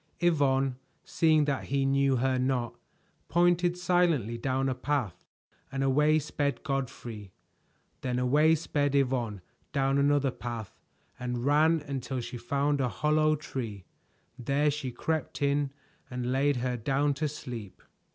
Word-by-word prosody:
Yvonne, 135 -6 +2 0.3
seeing 155 -2 +3
that 140 -2 -1
he 135 0 0
knew 135 0 +3
her 130 +1 +1
not, 125 -2 0 0.6
pointed 175 0 +3
silently 175 - +2
down 130 +3 -1
a 130 - +1
path, 125 - -2 0.4
and 135 0 -1
away 150 +3 +4
sped 145 -3 -2
Godfrey. 120 -7 -4 0.7
Then 125 -1 -1
away 150 +6 +4
sped 145 -3 -1
Yvonne 125 -7 0 0.3
down 135 -1 +2
another 140 -1 +3
path 120 -4 -6 0.4
and 125 0 -3
ran 155 +3 +4
until 135 -2 -4
she 120 +1 -6
found 140 +4 0
a 125 - +1
hollow 155 +4 +2
tree. 115 - -6 0.5
There 140 +4 +1
she 140 -3 -4
crept 160 +5 -3
in 140 0 +1 0.4
and 125 0 -3
laid 140 +2 +2
her 125 0 -1
down 140 +5 +1
to 150 +3 -1
sleep. 120 -8 -8
135 Hz, 135 wpm, -29 LUFS, 125-150 Hz, 0.7 s, away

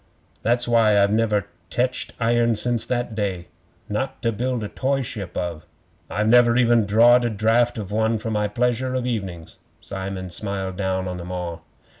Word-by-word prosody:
'That's 120 +1 +1
why 115 -3 +4
I've 100 0 +3
never 105 -2 +1 0.2
teched 125 +1 -1
iron 115 0 +2
since 115 +1 -1
that 120 -2 -2
day 95 -5 -3 0.4
not 130 +6 -3
to 115 - +2
build 125 +1 -2
a - - -3
toy 135 +5 -1
ship 100 -6 -6
of. 85 -3 -4 0.4
I've 105 +2 0
never 120 0 +5
even 120 -3 +4
drawed 120 +4 +6
a 120 - +1
draft 115 +3 +2
of 105 -3 -5
one 110 +1 +1
for 110 +1 -4
my 105 -1 0
pleasure 125 +4 0
of 125 -1 -1
evenings.' 95 -9 -4 0.2
Simon 95 -1 -5
smiled 95 0 -3
down 95 -1 -1
on 90 0 -4
them 90 +1 -7
all. 85 -2 -5
110 Hz, 175 wpm, -23 LUFS, 95-120 Hz, 0.4 s, drawed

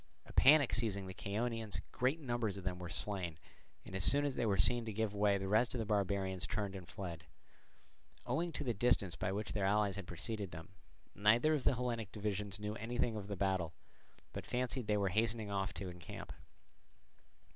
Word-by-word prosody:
A - - -13
panic 145 -1 +6
seizing 105 -3 +1
the 95 - -6
Chaonians, 110 +1 -2
great 130 +6 +1
numbers 120 -8 -1
of 95 - -7
them 90 -1 -2
were 90 -1 -6
slain; 90 -2 0 0.5
and - - -8
as 95 - +3
soon 145 +6 +6
as 140 - 0
they 120 -2 0
were 100 -2 +2
seen 120 +6 +4
to 110 - -3
give 110 0 -1
way 100 -1 +3
the 95 0 -3
rest 110 +5 +3
of - - 0
the 115 - -1
barbarians 95 -3 0
turned 100 -2 -2
and 90 -3 -8
fled. 85 -5 -6 1.0
Owing 170 +2 0
to 145 - -2
the 120 -4 0
distance 100 -5 +2
by 90 - -1
which 105 +2 -3
their 105 - -1
allies 100 -1 +2
had 100 -3 -6
preceded 100 +4 -4
them, 80 -1 -9 0.4
neither 115 +9 +4
of 145 -4 -1
the - - +4
Hellenic 115 -4 -2
divisions 105 -2 -3
knew 105 0 -3
anything 120 0 -1
of 100 -2 -5
the 100 -1 -4
battle, 95 -4 0 0.6
but - - -6
fancied 125 -1 -1
they 105 -1 +3
were 100 -1 +1
hastening 110 +1 0
on 95 -1 0
to 95 0 -6
encamp. 90 -2 -8
105 Hz, 200 wpm, -36 LUFS, 95-115 Hz, 1.0 s, panic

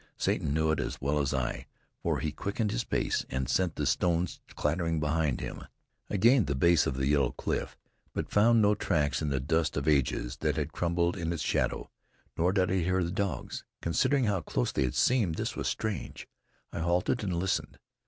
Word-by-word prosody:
Satan - - 0
knew 80 +1 +2
it 80 - 0
as - - -3
well 70 +2 0
as 70 -2 0
I, 65 -3 -2 0.3
for - - 0
he 75 - -1
quickened 100 +7 -2
his - - -1
pace - - 0
and 65 0 -2
sent 90 +1 +1
the 75 - -1
stones 85 +3 0
clattering 80 +1 0
behind 75 -2 0
him. - - -6 0.5
I 105 - -1
gained 115 - +5
the 70 - 0
base 85 +3 +4
of 65 - -1
the 65 - 0
yellow 70 -2 +2
cliff, - - -3 0.3
but - - -4
found 110 +2 +5
no 105 +1 +5
tracks 75 -8 0
in 75 - -1
the 70 -1 0
dust 80 +4 0
of 70 +1 -2
ages 70 -3 +1
that - - 0
had 75 0 -3
crumbled 85 0 0
in 85 -2 -2
its 80 -4 -2
shadow, - - -1 0.4
nor 90 +3 +2
did 95 -2 +1
I 95 - +2
hear 90 +1 +1
the 85 - -2
dogs. 95 -8 -3 0.2
Considering 125 - +1
how 100 -5 +1
close - - -1
they 65 - +1
had 60 - -3
seemed, 110 -10 +2
this - - -3
was - - -2
strange. 105 - -3 0.5
I - - -3
halted 90 +8 +1
and 95 -3 -1
listened. 90 +2 -1
80 Hz, 200 wpm, -29 LUFS, 70-95 Hz, 0.5 s, gained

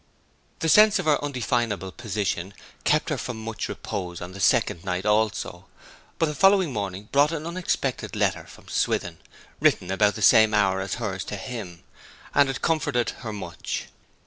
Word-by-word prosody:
The 165 - 0
sense 210 +5 +7
of - - -3
her 150 -2 +2
undefinable 115 -8 -1
position 100 -4 -3 0.3
kept - - +2
her - - -1
from 125 - -5
much 110 -2 -5
repose 90 -4 -5
on 90 +1 -7
the 95 - -10
second 90 -2 +2
night 90 0 -2
also; 105 -4 0 0.5
but 165 - +2
the 150 - -2
following 190 -1 +4
morning 100 -1 -4
brought 145 +2 +4
an 160 -2 -4
unexpected 175 +1 -2
letter - - 0
from - - -16
Swithin, - - -1 0.4
written 90 - +2
about 105 +1 +3
the 110 - -4
same 110 +1 +6
hour 95 -2 +2
as 95 0 -3
hers 95 -2 -3
to - - -5
him, 105 -6 -7 0.5
and 140 -1 +4
it 135 - -4
comforted 155 -7 +1
her 115 -3 -5
much. 90 -5 -5
105 Hz, 170 wpm, -25 LUFS, 95-140 Hz, 0.5 s, sense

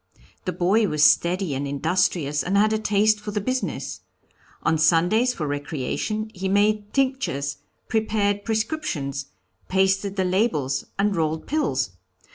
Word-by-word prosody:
The 185 - 0
boy 190 +5 +2
was 150 -3 +1
steady 175 +1 +3
and 140 +1 -2
industrious, 150 0 0
and 195 +2 0
had 215 +2 +4
a 220 - +1
taste 215 0 +2
for 210 0 -7
the 210 0 -1
business. 255 +5 -3 0.6
On 160 -1 +2
Sundays 175 +10 +3
for 155 - -3
recreation 145 - -3
he 190 -1 -3
made 205 +1 +2
tinctures, 260 - -1 0.3
prepared 210 -2 0
prescriptions, 215 - -2 0.4
pasted 195 +1 +1
the 190 -2 0
labels 160 - 0
and 200 0 +1
rolled 160 -1 -1
pills. 275 - 0
190 Hz, 135 wpm, -24 LUFS, 155-215 Hz, 0.6 s, had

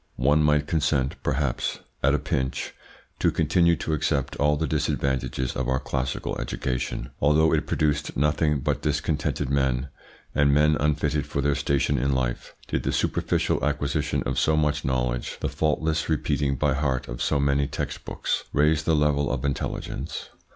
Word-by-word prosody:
One 75 +5 +3
might 75 -1 +3
consent, 75 -3 +1
perhaps, 65 -2 -1 0.2
at 70 +2 +3
a - - +3
pinch, 70 -3 -2 0.5
to - - +3
continue 85 +2 +3
to 80 - -3
accept 70 -2 0
all 75 +1 +2
the 80 - 0
disadvantages 65 -3 -1
of 65 -1 -1
our 65 - +2
classical 65 -1 -2
education, 65 -2 -3
although 75 +3 +4
it - - +1
produced 75 -1 0
nothing 75 0 +2
but 75 0 -1
discontented 75 -2 -1
men, 65 -1 +1 0.4
and 70 0 +4
men 75 +1 +4
unfitted 75 0 0
for - - -3
their 70 +1 +2
station 70 0 +1
in 70 +2 +1
life, 65 -2 -2
did - - -1
the - - -1
superficial - - 0
acquisition 75 0 0
of - - -1
so 80 0 +3
much 75 -1 +1
knowledge, 60 -2 -1
the - - -1
faultless 80 +1 0
repeating 70 -2 0
by 75 +1 +1
heart 65 -2 -1
of - - -6
so 70 - +1
many 70 0 +2
text - - -4
books, - - -2
raise 75 +1 +3
the 80 +1 +2
level 75 -1 +2
of 65 0 -2
intelligence. 70 +1 -4
70 Hz, 165 wpm, -25 LUFS, 65-75 Hz, 0.5 s, although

